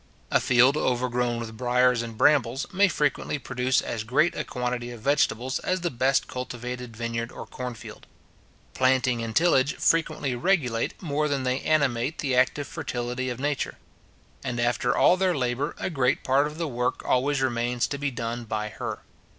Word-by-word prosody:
A - - +4
field 130 +3 +4
overgrown 125 -2 0
with 115 -1 -6
briars 125 0 +3
and 115 -2 -7
brambles, 135 0 +3
may 200 +2 +5
frequently 150 -3 0
produce 125 -1 0
as 110 -2 -3
great 140 +9 +2
a - - -3
quantity 125 -2 -3
of 120 -1 -8
vegetables 130 -1 +1
as 185 0 -1
the 175 - -1
best 130 +2 +1
cultivated 125 -2 -6
vineyard 115 0 -3
or - - -8
corn 125 -1 -6
field. - - -11 0.7
Planting 130 -2 +2
and 115 -1 -5
tillage 150 -4 +3
frequently 160 -5 +1
regulate 125 -5 0
more 150 -1 0
than 140 -2 -1
they 130 +1 0
animate 140 -2 +1
the 135 -3 -1
active 130 +3 +2
fertility 125 +1 -3
of 125 0 -5
Nature; 145 0 -2 0.7
and 125 -3 -3
after 120 +1 +1
all 180 - +5
their 185 -3 +1
labour, 130 +4 -1
a - - -3
great 135 -4 +1
part 135 +3 +3
of 150 +1 -8
the 165 -1 -2
work 125 -2 -2
always 140 +3 +2
remains 120 -1 0
to 140 - -4
be 145 0 0
done 120 -1 -4
by 105 -1 -3
her. - - -6
125 Hz, 175 wpm, -26 LUFS, 120-140 Hz, 0.7 s, may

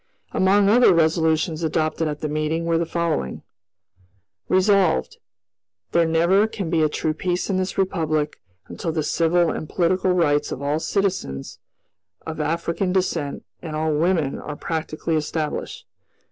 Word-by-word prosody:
Among 195 +2 +3
other 230 -2 +6
resolutions 160 0 +2
adopted 160 0 0
at 150 -1 -4
the 155 - -1
meeting 155 +2 -1
were 165 -1 +1
the 170 - -1
following: 165 - -2 1.1
"Resolved, 185 - +2 0.7
There 170 -1 +3
never 170 +6 +3
can 195 -6 -5
be 165 -2 +2
a 155 - +3
true 155 +1 -1
peace 180 +4 -2
in 190 - +1
this 185 0 -2
Republic 155 -5 -1 0.3
until 165 - -4
the 160 -1 -1
civil 170 +2 +2
and 155 - -5
political 185 +1 +1
rights 150 -5 +2
of - - -4
all 145 +2 -1
citizens 180 - -2 0.7
of - - -5
African 170 +3 -1
descent 175 -6 -1 0.2
and 160 -3 -6
all 155 0 0
women 160 -2 +1
are 150 - -6
practically 160 +1 -3
established. 155 0 -3
165 Hz, 145 wpm, -22 LUFS, 155-180 Hz, 1.1 s, other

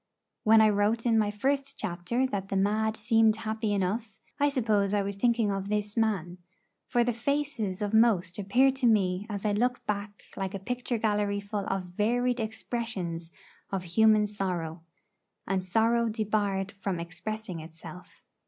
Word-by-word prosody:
When 220 +1 +6
I 215 - +6
wrote 210 +3 +1
in 225 -2 +4
my 210 -1 +2
first 270 +6 -1
chapter 180 +9 -1
that 200 -6 -3
the - - -2
mad 215 +3 +1
seemed 225 -1 +3
happy 220 -1 -2
enough, 205 +2 -1 0.2
I 290 0 +4
suppose 215 -7 +1
I 205 - +2
was 200 0 -3
thinking 230 0 +2
of 195 0 -3
this 210 0 -1
man; 190 -6 0 0.5
for 240 -1 +2
the 240 0 0
faces 240 -6 -1
of 205 +1 -2
most 210 -5 +3
appear 245 +7 +4
to 265 -2 0
me 195 -2 +2
as 205 -1 -4
I 210 - +2
look 245 +5 0
back 205 0 -4
like 195 0 -3
a - - -4
picture 245 +3 -3
gallery 205 -2 0
full 200 0 -4
of 195 -1 -1
varied 235 +7 0
expressions 215 -7 -3 0.4
of 195 -2 -2
human 215 +4 +4
sorrow, 180 -5 -3 0.6
and 190 -1 -1
sorrow 230 +4 +2
debarred 205 -3 -1
from 195 -3 -3
expressing 185 +2 -5
itself. 160 +2 -12
210 Hz, 160 wpm, -28 LUFS, 195-225 Hz, 0.6 s, When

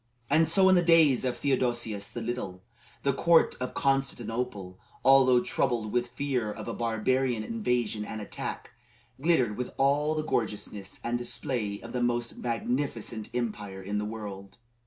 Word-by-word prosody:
And 160 0 +4
so 190 +3 +5
in 190 - +6
the 180 - +5
days 165 -6 +5
of 125 -2 -1
Theodosius 120 -6 0
the 120 - -7
Little, 100 -6 -4 0.4
the 140 - +2
court 165 +4 +4
of 125 - -3
Constantinople, 120 -7 -1 0.3
although 130 -2 +6
troubled 115 -5 0
with 120 0 +1
fear 125 -3 -2
of - - -8
a - - -3
barbarian 120 +1 0
invasion 125 - -1
and 110 +1 -6
attack, 105 - -6 0.5
glittered 130 -10 +2
with 125 0 -4
all 145 +3 +2
the 155 0 -2
gorgeousness 105 -6 -3
and 120 +1 -1
display 120 -5 -3
of - - -9
the 125 - -1
most 120 -1 -1
magnificent 120 -2 -2
empire 105 -5 -3
in 105 +2 -2
the - - -2
world. 100 -3 -7
120 Hz, 155 wpm, -28 LUFS, 110-135 Hz, 0.5 s, in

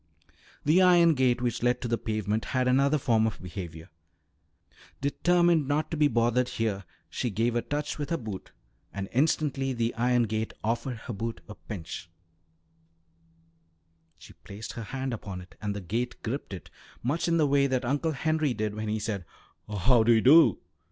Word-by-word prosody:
The 160 +6 +5
iron 175 -2 +6
gate 125 -3 +1
which 120 -1 -1
led 125 +1 +2
to - - -2
the 115 - +1
pavement 110 0 -2
had 125 0 +2
another 140 +4 +3
form 115 -5 +2
of 110 - -5
behaviour. 85 -2 -8 1.1
Determined 170 +1 +2
not 145 +2 0
to - - -1
be 150 -1 +5
bothered 120 0 +1
here, 105 -4 -2 0.2
she 125 - -2
gave 115 +3 0
a 120 - +2
touch 150 +3 -3
with 145 -1 -3
her 165 - 0
boot, 110 - -7 0.4
and 100 -1 -5
instantly 135 -1 +1
the 115 -1 -1
iron 125 +1 +2
gate 110 0 -3
offered 115 +3 -1
her 120 - -4
boot 115 +3 -4
a 105 - -8
pinch; 90 -3 -8 2.1
she - - -14
placed 105 +2 -8
her 115 - -6
hand 130 +2 -4
upon 100 -4 -6
it 90 0 -13
and 105 -1 -2
the 100 - -4
gate 115 +7 -2
gripped 125 +2 -4
it, 95 - -8 0.3
much 145 +9 0
in 170 0 +2
the 155 - +4
way 140 -1 +3
that 130 -1 -1
Uncle 145 +5 0
Henry 155 -2 0
did 105 -1 -2
when 110 +1 -4
he 105 +1 0
said 105 -3 -3 0.5
"How 115 +4 +3
do 115 +2 +4
you 110 - +4
do?" 155 +7 +7
120 Hz, 180 wpm, -28 LUFS, 110-140 Hz, 2.1 s, do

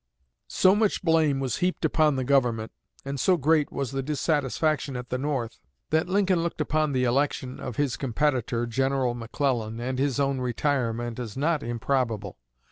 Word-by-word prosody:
So 185 - +4
much 210 -2 +1
blame 160 -5 +3
was 130 -4 -1
heaped 180 +1 0
upon 155 -3 +3
the 130 - -1
Government, 120 -5 +1 0.3
and 140 0 -4
so 180 +7 +3
great 155 0 +2
was 140 -3 -3
the 135 0 -2
dissatisfaction 150 0 0
at 125 0 -7
the 125 - -2
North, 130 -5 -2 0.3
that 160 +3 +1
Lincoln 190 -2 +2
looked 170 -1 -3
upon 155 0 +1
the 130 -1 +1
election 130 0 0
of 125 - -5
his 145 -2 0
competitor, 125 -3 0
General 130 +1 0
McClellan, 115 -1 -2
and 130 +2 -3
his 140 0 0
own 140 -1 +1
retirement, 120 -2 -1
as 120 -1 -6
not 155 +2 +1
improbable. 115 - -2
135 Hz, 165 wpm, -26 LUFS, 120-150 Hz, 0.3 s, So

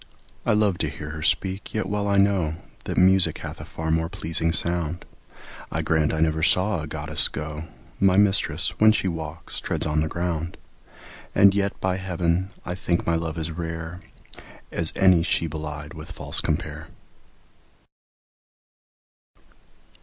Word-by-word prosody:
I - - +4
love 105 -4 +1
to - - 0
hear 75 0 -8
her 80 -1 -7
speak, 95 +7 0
yet 110 - 0
well 105 0 -2
I 100 0 +2
know 95 -6 +2 0.3
That - - -4
music 95 0 +4
hath - - -7
a - - -8
far 80 0 -4
more 80 0 0
pleasing 85 -3 +2
sound; 85 0 +2 0.7
I - - -2
grant 80 -2 +1
I 80 - -2
never 80 0 +1
saw 90 +3 +4
a 80 - -6
goddess 75 0 +1
go; 75 +2 -6 0.3
My 95 -1 +4
mistress, 95 -4 +3
when 110 0 +6
she 100 - 0
walks, 80 -1 -4
treads - - -2
on 75 0 0
the 80 - 0
ground: 85 0 -3 0.8
And 100 0 +6
yet, 100 0 -1
by 95 0 -1
heaven, 90 0 -1 0.2
I 90 - -2
think 90 -1 -1
my 85 - +1
love 80 -1 -2
as 80 0 -3
rare 80 +1 -6 0.7
As 85 -2 +2
any 95 -3 +5
she 85 0 0
belied 75 -1 -6
with 75 -1 -10
false - - -1
compare. - - -3
85 Hz, 155 wpm, -24 LUFS, 80-95 Hz, 0.8 s, when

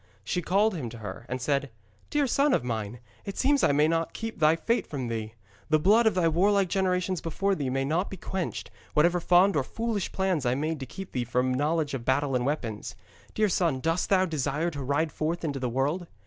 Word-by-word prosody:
She 180 - -1
called 200 +5 +2
him 140 -10 -4
to 115 - -10
her, 115 +2 -8
and 130 +1 -2
said: 140 +1 0 0.4
'Dear 295 -1 +2
son 275 +3 +3
of - - -1
mine, 115 -1 -4 0.2
it 200 - -6
seems 280 +1 +2
I - - +5
may 150 +2 +4
not 165 0 -1
keep 225 -3 -5
thy 155 0 +5
fate 230 +9 0
from 130 -5 -4
thee. 110 -1 -4 0.3
The 155 - +5
blood 215 +9 +4
of 220 - +2
thy 180 -3 +3
warlike 195 +3 +3
generations 185 -2 0
before 195 +5 0
thee 145 -8 -2
may 135 +1 0
not 165 +7 0
be 195 - -7
quenched, 185 +1 -4 0.2
whatever 170 +3 +4
fond 180 +3 +4
and 145 - +2
foolish 225 - -3
plans 190 -6 0
I 125 0 +1
made 155 +2 -2
to 135 - -6
keep 190 +7 -8
thee 125 - -1
from 125 +2 0
knowledge 150 +2 0
of 130 -3 -3
battle 135 +2 +1
and 125 +1 0
weapons. 120 -8 -3 0.4
Dear 215 0 +3
son, 170 -7 +1
dost 165 +5 0
thou 190 -1 +4
desire 155 0 -1
to 145 -3 -6
ride 145 +4 0
forth 165 +4 -2
into 145 -4 -2
the 125 -1 -1
world?' 145 +8 -1
160 Hz, 220 wpm, -27 LUFS, 135-190 Hz, 0.4 s, I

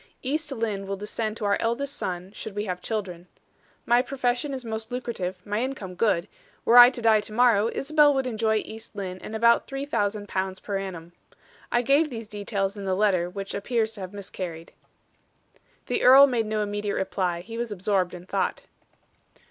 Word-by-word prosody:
East 300 +3 -2
Lynne 215 -6 -2
will 195 - -2
descend 215 +2 -3
to 215 - -4
our 200 0 +2
eldest 265 +5 -1
son, 180 +1 -4
should 215 -1 -7
we 205 +1 -2
have 180 -2 -4
children. 185 -6 -4 0.6
My 240 +1 +4
profession 255 +1 -1
is 260 -2 -5
most 220 0 -5
lucrative, 230 -7 -3
my 210 +2 -1
income 250 -8 -4
good; 185 -2 +1 0.4
were 240 +2 +8
I 245 0 +11
to 245 -2 -8
die 220 -2 +5
to 215 - -9
morrow, 230 -2 +4
Isabel 300 +1 +4
would 265 -1 0
enjoy 220 -3 0
East 220 0 -11
Lynne 185 -2 -5
and 220 - -7
about 235 +1 +4
three 275 0 -4
thousand 205 -6 -1
pounds 190 -1 -2
per 200 -2 -3
annum. 175 -3 -7 0.6
I 240 0 +2
gave 285 +5 +3
these 225 -4 -7
details 200 -1 -2
in 200 -1 -7
the 190 -1 0
letter, 185 -4 +2
which 195 +1 -6
appears 220 +2 -1
to 210 - -10
have 185 -1 -6
miscarried." 180 -4 -7 1.1
The - - -1
earl 270 +2 +9
made 240 -5 0
no 215 0 0
immediate 205 0 -2
reply; 180 -2 -1
he 225 +5 -9
was 235 -2 -3
absorbed 190 -2 0
in 180 0 -10
thought. - - -2
215 Hz, 190 wpm, -26 LUFS, 195-240 Hz, 1.1 s, I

